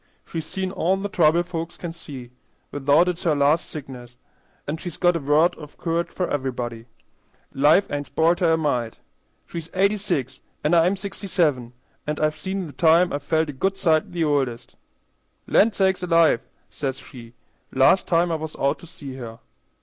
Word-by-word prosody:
"She's 160 Hz, -2 st, -5 dB
seen 190 Hz, +1 st, -3 dB
all 190 Hz, 0 st, +1 dB
the 200 Hz, +1 st, -4 dB
trouble 170 Hz, -2 st, +3 dB
folks 170 Hz, -1 st, -6 dB
can 170 Hz, -, -5 dB
see, 135 Hz, -7 st, -10 dB, 0.4 s
without 145 Hz, +5 st, +3 dB
it's 180 Hz, 0 st, -2 dB
her 160 Hz, -4 st, +1 dB
last 145 Hz, +3 st, +2 dB
sickness; 125 Hz, -4 st, -9 dB, 0.5 s
an' 150 Hz, +3 st, -3 dB
she's 175 Hz, 0 st, -7 dB
got 175 Hz, -1 st, +3 dB
a -, -, 0 dB
word 150 Hz, +4 st, +3 dB
of 150 Hz, -2 st, -12 dB
courage 170 Hz, 0 st, -1 dB
for 180 Hz, -, -2 dB
everybody. 120 Hz, -4 st, -4 dB, 0.7 s
Life 150 Hz, +8 st, +4 dB
ain't 145 Hz, 0 st, -3 dB
spoilt 170 Hz, +2 st, +2 dB
her 170 Hz, -3 st, +3 dB
a -, -, +3 dB
mite. 125 Hz, -8 st, -1 dB, 0.5 s
She's 165 Hz, -1 st, -7 dB
eighty 200 Hz, +3 st, +3 dB
six 135 Hz, -, -2 dB, 0.2 s
an' 150 Hz, +3 st, +1 dB
I'm 175 Hz, +3 st, +4 dB
sixty 200 Hz, +1 st, -7 dB
seven, 145 Hz, -10 st, 0 dB, 0.3 s
and 150 Hz, 0 st, -2 dB
I've 155 Hz, 0 st, +1 dB
seen 190 Hz, +4 st, -4 dB
the 150 Hz, -, -10 dB
time 170 Hz, +2 st, +4 dB
I've 145 Hz, -, -2 dB
felt 160 Hz, +2 st, 0 dB
a -, -, -5 dB
good 195 Hz, +8 st, -1 dB
sight 160 Hz, -5 st, +2 dB
the 175 Hz, -2 st, -1 dB
oldest. 135 Hz, -6 st, -1 dB, 0.7 s
'Land 215 Hz, 0 st, +3 dB
sakes 190 Hz, -2 st, +2 dB
alive!' 165 Hz, -7 st, +3 dB, 0.3 s
says 135 Hz, -2 st, -3 dB
she, 120 Hz, -3 st, -13 dB, 0.4 s
last 135 Hz, +8 st, +4 dB
time 170 Hz, 0 st, +2 dB
I -, -, +1 dB
was 160 Hz, -1 st, -6 dB
out 140 Hz, 0 st, 0 dB
to 175 Hz, -, -13 dB
see 140 Hz, -5 st, -9 dB
her. 115 Hz, -3 st, -8 dB
160 Hz, 180 wpm, -23 LUFS, 140-175 Hz, 0.7 s, Life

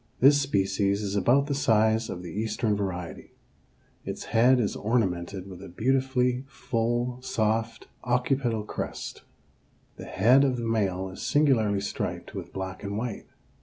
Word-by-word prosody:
This 140 Hz, +2 st, +6 dB
species 100 Hz, -4 st, +1 dB
is 100 Hz, 0 st, -2 dB
about 125 Hz, +7 st, +3 dB
the 145 Hz, -, -2 dB
size 110 Hz, -5 st, +2 dB
of 90 Hz, -, -6 dB
the 85 Hz, -, -7 dB
eastern 110 Hz, 0 st, -1 dB
variety. 95 Hz, -4 st, -5 dB, 0.7 s
Its -, -, -5 dB
head 125 Hz, +3 st, +5 dB
is 105 Hz, -4 st, 0 dB
ornamented 95 Hz, -5 st, -1 dB
with 95 Hz, -2 st, -10 dB
a -, -, -9 dB
beautifully 125 Hz, +4 st, +1 dB
full, 120 Hz, 0 st, -2 dB
soft 115 Hz, -2 st, -1 dB, 0.2 s
occipital 125 Hz, -2 st, 0 dB
crest. 105 Hz, -, -6 dB, 0.8 s
The -, -, -8 dB
head 125 Hz, +8 st, +4 dB
of 130 Hz, -3 st, +1 dB
the 120 Hz, -, -3 dB
male 95 Hz, -4 st, 0 dB
is 95 Hz, -, -9 dB
singularly 115 Hz, -9 st, +2 dB
striped -, -, -4 dB
with -, -, -7 dB
black 95 Hz, -1 st, -5 dB
and 100 Hz, 0 st, -3 dB
white. 115 Hz, -2 st, -4 dB
110 Hz, 145 wpm, -27 LUFS, 100-125 Hz, 0.8 s, This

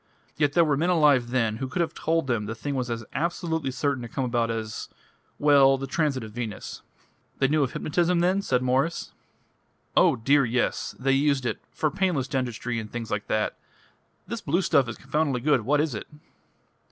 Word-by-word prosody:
Yet 145 Hz, -1 st, +1 dB
there 170 Hz, -1 st, +5 dB
were 150 Hz, -2 st, +2 dB
men 170 Hz, +5 st, +1 dB
alive 145 Hz, -8 st, +4 dB
then 115 Hz, -4 st, 0 dB
who 130 Hz, +2 st, -3 dB
could 130 Hz, -, -4 dB
have 170 Hz, -, -1 dB
told 165 Hz, 0 st, 0 dB
them 115 Hz, -5 st, -1 dB
the 110 Hz, -, -4 dB
thing 140 Hz, +6 st, -4 dB
was 125 Hz, -2 st, -2 dB
as 115 Hz, -1 st, -4 dB
absolutely 160 Hz, -1 st, -1 dB
certain 140 Hz, 0 st, -1 dB
to 120 Hz, -, -6 dB
come 130 Hz, +3 st, -2 dB
about 120 Hz, -1 st, 0 dB
as 110 Hz, -1 st, -4 dB, 0.5 s
well, 140 Hz, -2 st, +5 dB
the 135 Hz, -, -4 dB
transit 135 Hz, -2 st, -1 dB
of 110 Hz, -, -8 dB
Venus." 110 Hz, -2 st, -6 dB, 0.6 s
"They 135 Hz, -, +3 dB
knew 150 Hz, +2 st, +2 dB
of 135 Hz, -, 0 dB
hypnotism, 175 Hz, +3 st, +1 dB
then?" 185 Hz, +3 st, +2 dB, 1.5 s
"Oh, -, -, +5 dB
dear, 140 Hz, +5 st, +3 dB
yes! 125 Hz, 0 st, -1 dB
They 135 Hz, +2 st, +1 dB
used 140 Hz, -1 st, +2 dB
it -, -, -2 dB
for 155 Hz, -, -1 dB
painless 180 Hz, -9 st, 0 dB
dentistry 125 Hz, -3 st, -2 dB
and 110 Hz, -1 st, -8 dB
things 115 Hz, -2 st, -5 dB
like 105 Hz, 0 st, -2 dB
that! 110 Hz, 0 st, -1 dB, 0.7 s
This 230 Hz, -2 st, -5 dB
blue 170 Hz, +4 st, 0 dB
stuff 130 Hz, -7 st, +3 dB
is 115 Hz, -, -6 dB
confoundedly 140 Hz, -2 st, -1 dB
good: 140 Hz, -2 st, +3 dB
what 145 Hz, +3 st, +3 dB
is 150 Hz, -3 st, 0 dB
it?" 110 Hz, -, -6 dB
135 Hz, 190 wpm, -26 LUFS, 120-150 Hz, 1.5 s, there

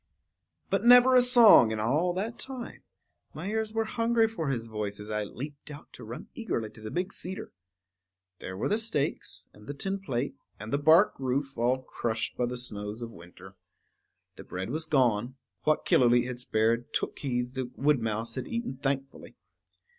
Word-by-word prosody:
But 195 Hz, +1 st, +1 dB
never 245 Hz, +2 st, +8 dB
a 250 Hz, -, +8 dB
song 240 Hz, -, +7 dB
in 110 Hz, -, -2 dB
all 145 Hz, +11 st, +1 dB
that 210 Hz, +6 st, -4 dB
time; 260 Hz, -3 st, -6 dB, 0.5 s
my 200 Hz, -, -4 dB
ears 220 Hz, 0 st, -1 dB
were 225 Hz, 0 st, 0 dB
hungry 230 Hz, 0 st, +2 dB
for 195 Hz, -9 st, -4 dB
his 120 Hz, -4 st, -2 dB
voice 105 Hz, -2 st, -4 dB
as 105 Hz, +1 st, -7 dB
I 105 Hz, 0 st, -1 dB
leaped 140 Hz, +8 st, -8 dB
out 145 Hz, 0 st, -11 dB
to -, -, -11 dB
run 115 Hz, +2 st, -8 dB
eagerly 115 Hz, -, -3 dB
to 110 Hz, -, -14 dB
the 110 Hz, -, -6 dB
big 180 Hz, -, -3 dB
cedar. 185 Hz, +2 st, -5 dB, 0.9 s
There 95 Hz, -, -7 dB
were -, -, -1 dB
the 210 Hz, -, +1 dB
stakes, 220 Hz, -11 st, -2 dB
and 105 Hz, +1 st, -17 dB
the 145 Hz, -, -5 dB
tin 195 Hz, +6 st, -2 dB
plate, 135 Hz, -8 st, -3 dB, 0.3 s
and 110 Hz, +4 st, -7 dB
the 140 Hz, -, +2 dB
bark 160 Hz, +7 st, +5 dB
roof 135 Hz, +1 st, -2 dB
all 125 Hz, +3 st, 0 dB
crushed 110 Hz, -3 st, -3 dB
by 125 Hz, -, 0 dB
the 125 Hz, +1 st, -4 dB
snows 105 Hz, -2 st, -5 dB
of 115 Hz, -, -7 dB
winter. 90 Hz, +1 st, -14 dB, 0.8 s
The -, -, -9 dB
bread 95 Hz, +4 st, -5 dB
was 155 Hz, +2 st, -2 dB
gone; 125 Hz, -4 st, +2 dB, 0.3 s
what 155 Hz, 0 st, +2 dB
Killooleet 120 Hz, -1 st, +4 dB
had 125 Hz, -1 st, -5 dB
spared, 115 Hz, 0 st, 0 dB
Tookhees 125 Hz, -3 st, -2 dB
the 130 Hz, -2 st, -4 dB
wood 145 Hz, -2 st, +2 dB
mouse 110 Hz, +1 st, -2 dB
had 130 Hz, -, -5 dB
eaten 235 Hz, -, -4 dB
thankfully. 135 Hz, 0 st, -4 dB
130 Hz, 180 wpm, -28 LUFS, 115-190 Hz, 0.9 s, never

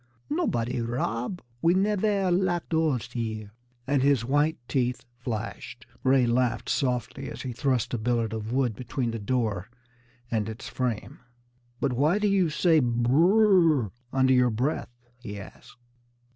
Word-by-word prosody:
"Nobody 125 Hz, -, 0 dB
rob. 120 Hz, -, -2 dB, 0.2 s
We 170 Hz, +2 st, +4 dB
nevaire 200 Hz, -1 st, +1 dB
lock 175 Hz, -1 st, +1 dB
doors 160 Hz, -7 st, 0 dB
here," 110 Hz, -3 st, -4 dB, 0.3 s
and 140 Hz, 0 st, +1 dB
his 135 Hz, -4 st, +3 dB
white 145 Hz, +5 st, +2 dB
teeth 125 Hz, -2 st, -1 dB
flashed. 115 Hz, -1 st, -5 dB, 0.2 s
Ray 130 Hz, -1 st, +4 dB
laughed 120 Hz, 0 st, 0 dB
softly 125 Hz, -3 st, -1 dB
as -, -, -7 dB
he 130 Hz, -, -4 dB
thrust 130 Hz, -1 st, 0 dB
a 120 Hz, -, 0 dB
billet 115 Hz, -1 st, 0 dB
of 110 Hz, 0 st, -4 dB
wood 125 Hz, -4 st, +1 dB
between 125 Hz, 0 st, -3 dB
the 115 Hz, -, -4 dB
door 105 Hz, -4 st, -1 dB, 0.6 s
and 110 Hz, -2 st, 0 dB
its 110 Hz, -, -7 dB
frame. 125 Hz, -5 st, -3 dB, 0.6 s
"But 130 Hz, -, 0 dB
why 150 Hz, +9 st, +2 dB
do 210 Hz, 0 st, +1 dB
you 195 Hz, -4 st, +3 dB
say 160 Hz, +1 st, +3 dB
'br 120 Hz, -2 st, +1 dB
r 180 Hz, -, +5 dB
r!' 100 Hz, -, -7 dB, 0.2 s
under 130 Hz, 0 st, +3 dB
your 125 Hz, -1 st, +4 dB
breath?" 125 Hz, +7 st, -1 dB, 0.3 s
he 105 Hz, -4 st, -7 dB
asked. 100 Hz, -, -13 dB
125 Hz, 150 wpm, -27 LUFS, 115-160 Hz, 0.6 s, r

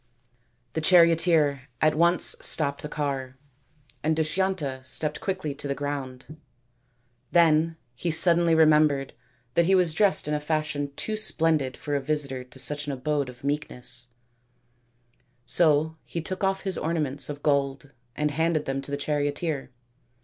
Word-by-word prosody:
The 160 Hz, -, -2 dB
charioteer 165 Hz, -5 st, +4 dB
at 155 Hz, 0 st, +3 dB
once 170 Hz, +2 st, +4 dB
stopped 140 Hz, -3 st, +2 dB
the 150 Hz, -, -6 dB
car, 135 Hz, -4 st, -4 dB, 0.6 s
and 155 Hz, +1 st, +1 dB
Dushyanta 155 Hz, -5 st, -1 dB
stepped 150 Hz, +3 st, -3 dB
quickly 190 Hz, -8 st, -3 dB
to 145 Hz, 0 st, -7 dB
the 140 Hz, -, -2 dB
ground. 145 Hz, +1 st, -6 dB, 0.9 s
Then 165 Hz, -1 st, +3 dB, 0.2 s
he 150 Hz, +8 st, -3 dB
suddenly 170 Hz, 0 st, +5 dB
remembered 150 Hz, -3 st, +3 dB, 0.4 s
that 170 Hz, +6 st, +3 dB
he 190 Hz, +2 st, +4 dB
was 180 Hz, -4 st, +2 dB
dressed 200 Hz, -4 st, +2 dB
in 150 Hz, -, -1 dB
a 150 Hz, -, 0 dB
fashion 150 Hz, -2 st, -2 dB
too 215 Hz, -, -3 dB
splendid 160 Hz, -10 st, 0 dB
for 145 Hz, -, -3 dB
a 140 Hz, -, 0 dB
visitor 140 Hz, -2 st, -1 dB
to 125 Hz, +1 st, -13 dB
such 145 Hz, +2 st, 0 dB
an 140 Hz, -, -2 dB
abode 140 Hz, +1 st, -2 dB
of 125 Hz, 0 st, -14 dB
meekness; 125 Hz, -4 st, -4 dB, 1.4 s
so 160 Hz, -1 st, +2 dB
he 170 Hz, -, -5 dB
took 185 Hz, +4 st, -5 dB
off 195 Hz, 0 st, +1 dB
his 190 Hz, -3 st, -1 dB
ornaments 150 Hz, -4 st, -1 dB
of 145 Hz, 0 st, -7 dB
gold 140 Hz, -1 st, 0 dB, 0.2 s
and 150 Hz, 0 st, 0 dB
handed 160 Hz, +1 st, 0 dB
them 135 Hz, 0 st, -2 dB
to 135 Hz, -, -7 dB
the 140 Hz, -, -2 dB
charioteer. 145 Hz, 0 st, -2 dB
150 Hz, 150 wpm, -26 LUFS, 140-165 Hz, 1.4 s, suddenly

